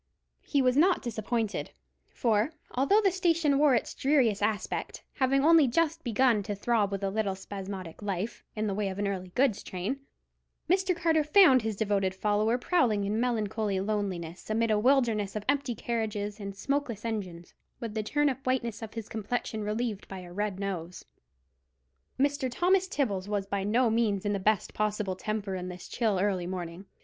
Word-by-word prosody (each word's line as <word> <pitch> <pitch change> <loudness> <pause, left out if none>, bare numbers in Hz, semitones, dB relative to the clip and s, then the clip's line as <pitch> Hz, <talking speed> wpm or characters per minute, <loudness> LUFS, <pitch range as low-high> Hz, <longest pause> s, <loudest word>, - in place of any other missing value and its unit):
He 280 -3 +1
was 255 0 +3
not 350 +5 +4
disappointed; 225 -1 -2 0.4
for, 230 +5 +1 0.2
although 335 +12 +3
the 390 -3 +3
station 335 -6 +2
wore 290 -3 +5
its 235 - -1
dreariest 260 -8 +2
aspect, 210 0 -2
having 270 +1 +2
only 325 -3 +7
just 325 +5 +1
begun 235 -2 +3
to 205 +1 -4
throb 210 -1 +1
with 200 0 -3
a 195 - 0
little 205 -2 -1
spasmodic 190 -2 -7
life, 200 +2 -3
in 215 0 -1
the 205 - -1
way 200 0 -1
of 190 - -6
an 205 0 0
early 185 -2 -3
goods 255 -5 +2
train, 190 +9 -4 0.7
Mr. 375 +1 +2
Carter 325 -2 +2
found 300 -5 +6
his 220 -1 -2
devoted 200 -3 0
follower 210 +4 +1
prowling 245 - +2
in 210 +2 -1
melancholy 215 -4 0
loneliness 190 -4 -3
amid 225 +1 +1
a 210 - +3
wilderness 230 -5 +2
of 210 -1 -4
empty 280 -3 0
carriages 215 -2 -3
and 200 -1 -6
smokeless 255 -2 -2
engines, 185 -7 -5 0.3
with 230 -3 -5
the 215 - -1
turnip 275 +3 0
whiteness 240 -4 -1
of 225 0 -8
his 225 -2 -5
complexion 220 0 -3
relieved 210 -1 -2
by 190 -1 -7
a 175 -1 -11
red 205 0 -2
nose. 180 -3 -5 1.1
Mr. 285 -1 +1
Thomas 370 +7 +2
Tibbles 205 - -1
was 205 -1 -1
by 200 0 -2
no 230 +3 +2
means 220 -3 +1
in 205 - +1
the 200 - -1
best 210 0 +1
possible 210 -2 -1
temper 210 0 -3
in 180 -1 -4
this 180 0 -9
chill 220 -5 0
early 185 -3 0
morning. 180 0 -6
215 Hz, 175 wpm, -29 LUFS, 200-260 Hz, 1.1 s, only